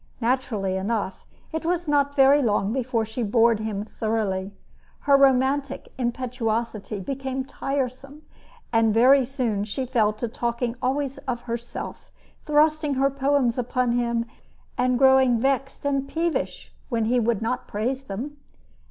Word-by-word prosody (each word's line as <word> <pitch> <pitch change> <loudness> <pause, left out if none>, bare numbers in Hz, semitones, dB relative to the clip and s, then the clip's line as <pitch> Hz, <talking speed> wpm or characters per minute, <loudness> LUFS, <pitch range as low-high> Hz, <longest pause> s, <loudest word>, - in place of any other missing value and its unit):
Naturally 225 -6 0
enough, 200 0 -3 0.2
it 320 0 -3
was 350 0 -1
not 285 -1 +2
very 280 +1 +6
long 210 -3 +1
before 245 -3 0
she 220 +3 -5
bored 230 0 +3
him 215 -2 -3
thoroughly. 210 -4 -2 0.5
Her 280 -1 +4
romantic 275 0 +2
impetuosity 235 -4 -2
became 265 +4 -4
tiresome, 275 +2 -4 0.5
and 225 -1 +3
very 260 +4 +6
soon 240 -6 -1
she 220 +5 -3
fell 230 -4 +2
to 215 +3 -4
talking 235 +1 -2
always 275 +1 -1
of 240 -1 -2
herself, 235 0 -6 0.4
thrusting 300 -1 +3
her 275 +1 +2
poems 270 -3 +1
upon 250 0 0
him, 235 -1 0 0.5
and 250 0 +1
growing 265 -2 +5
vexed 270 +2 -1
and 275 -1 0
peevish 330 +3 -2 0.2
when 230 -4 0
he 245 +2 +2
would 225 -2 0
not 250 +3 -2
praise 255 +6 -2
them. 260 +9 -6
250 Hz, 135 wpm, -24 LUFS, 225-275 Hz, 0.5 s, very